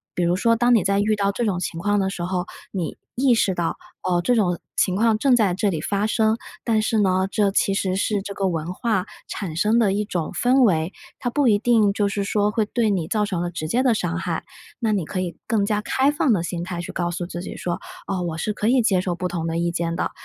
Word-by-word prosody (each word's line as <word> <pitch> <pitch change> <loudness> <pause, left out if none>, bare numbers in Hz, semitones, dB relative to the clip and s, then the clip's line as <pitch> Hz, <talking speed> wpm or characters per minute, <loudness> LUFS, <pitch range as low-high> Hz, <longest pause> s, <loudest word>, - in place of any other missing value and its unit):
比 180 - 0
如 175 +1 +2
说， 230 +4 +3
当 240 +1 +3
你 215 - +3
在 200 +1 +2
遇 215 +1 +2
到 200 -1 +1
这 235 +3 -2
种 185 -4 0
情 165 -1 -4
况 205 +3 +1
的 190 0 +1
时 175 -3 -5
候， 180 0 -1 0.3
你 180 -5 -3 0.2
意 255 0 +4
识 195 -4 +2
到， 170 -1 -1 0.3
哦， 175 -1 +1
这 245 +6 +2
种 180 -6 +1 0.2
情 185 - +2
况 220 +1 +3
正 255 +1 +4
在 205 -6 +3
这 205 +2 +1
里 160 -4 -2
发 200 +5 -1
生。 220 0 +2 0.3
但 220 -2 +2
是 220 0 +1
呢， 190 -1 +2
这 205 -2 +2
其 195 0 +2
实 190 -1 0
是 205 0 0
这 200 0 -6
个 195 -1 -1
文 165 +1 -3
化 215 -3 0 0.2
产 175 -6 -4
生 215 +7 +3
的 200 -4 +3
一 210 +1 0
种 175 -5 -3
氛 255 +2 +3
围， 170 -5 +2 0.3
它 245 - -1
不 280 +1 +2
一 205 -2 +5
定 220 -4 +3
就 205 -1 +1
是 200 0 -2
说 205 0 +1
会 220 -1 +1
对 225 +1 0
你 180 -6 0
造 210 +1 +1
成 185 -4 -2
了 175 - -1
直 160 -2 -4
接 250 +6 +2
的 250 -3 +4
伤 175 -3 -1
害。 170 -3 -3 0.4
那 225 -3 +1
你 190 -6 0
可 185 - -4
以 175 -2 -4
更 210 -3 +2
加 210 0 0
开 270 +6 +2
放 290 -5 +2
的 175 - +1
心 170 0 -3
态 175 -1 -4
去 - - -6
告 175 -1 -1
诉 175 +1 -3
自 175 0 -6
己 - - -7
说： 175 -1 -3 0.3
“哦， 190 -2 -1
我 165 -2 -3
是 210 - -1
可 210 - -2
以 250 0 +4
接 195 -5 +2
受 180 -1 -2
不 180 +1 -2
同 170 -2 -3
的 165 0 -1
意 170 0 0
见 170 0 -2
的， - - -1
200 Hz, 285 characters per minute, -23 LUFS, 175-220 Hz, 0.4 s, 一